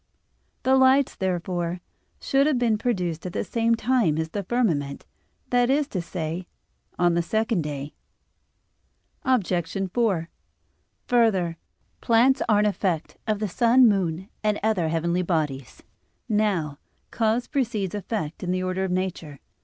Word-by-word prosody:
The 260 +1 +4
lights, 265 +1 +4
therefore, 175 -1 -2 0.4
should 275 +1 +2
have 300 -4 +2
been 230 -3 +1
produced 180 -9 -1
at 180 - -7
the - - -1
same 230 0 +1
time 225 -9 +1
as 160 0 -2
the 200 +5 -3
firmament, 175 - -1 0.5
that 245 0 +3
is 285 +1 +2
to 185 - -2
say, 170 +1 -5 0.5
on 175 -1 +3
the 170 - +2
second 220 +2 0
day. 145 -1 -5 1.3
Obj. 255 - +1 0.4
4: 200 -9 +1 0.8
Further, 195 -9 +2 0.4
plants 245 +4 +4
are 215 - +5
an 210 - +3
effect 190 -5 -1
of 215 -1 +1
the 210 +1 -2
sun, 240 +5 +5
moon, 190 -3 0 0.2
and 210 -1 +1
other 210 -7 +1
heavenly 170 +2 0
bodies. 150 -8 -2 0.4
Now, 195 -9 0 0.3
cause 225 +2 +1
precedes 225 - -2
effect 205 -6 -4
in 180 - -4
the 185 0 0
order 185 +1 -1
of 190 - -1
nature. 180 -6 -3
195 Hz, 140 wpm, -25 LUFS, 170-230 Hz, 1.3 s, are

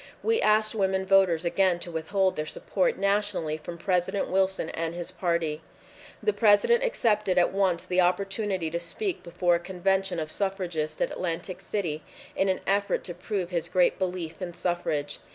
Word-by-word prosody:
We 455 0 +2
asked 215 0 +3
women 190 -2 0
voters 190 -3 +4
again 185 0 +2
to 175 - -4
withhold 185 +4 0
their 155 0 -3
support - - -1
nationally 200 -6 0
from 170 +2 -8
President 180 +2 0
Wilson 190 -3 +1
and 165 0 -3
his 175 +1 -5
party. 170 -4 -1 0.6
The 425 - +2
President 230 - +4
accepted 210 - +1
at 175 - +4
once 190 -3 +1
the 185 0 +2
opportunity 190 -1 0
to 170 - -1
speak 360 - -3
before 175 +1 +1
a 170 - +2
convention 190 0 0
of 155 -1 -3
suffragists 175 -6 -2
at - - +1
Atlantic 180 +1 -4
City 165 -7 -3 0.3
in 195 - +1
an 185 - 0
effort 200 +1 +1
to 175 - -6
prove 180 +1 -3
his 170 -2 -2
great 180 0 +3
belief 180 -2 -3
in 175 -2 -5
suffrage. 150 -5 -2
185 Hz, 170 wpm, -27 LUFS, 170-195 Hz, 0.6 s, voters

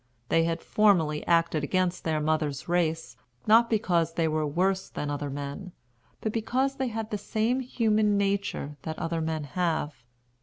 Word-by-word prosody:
They 165 0 +3
had 165 0 -2
formerly 170 -8 +3
acted 165 -3 +2
against 180 +3 0
their 160 -1 +1
mothers' 150 -2 -1
race, 165 -2 0 0.3
not 230 +2 +5
because 175 -7 +1
they 165 -1 +1
were 155 -1 0
worse 185 +5 0
than 145 0 -4
other 145 0 -3
men, 145 +7 -6 0.5
but 220 - -1
because 260 +4 0
they 265 - -1
had 225 -2 -4
the 210 - -2
same 225 +5 0
human 215 -5 +1
nature 195 -7 -1
that 155 +1 -5
other 165 0 -2
men 160 -1 -2
have. 155 -3 -2
170 Hz, 160 wpm, -27 LUFS, 155-210 Hz, 0.5 s, not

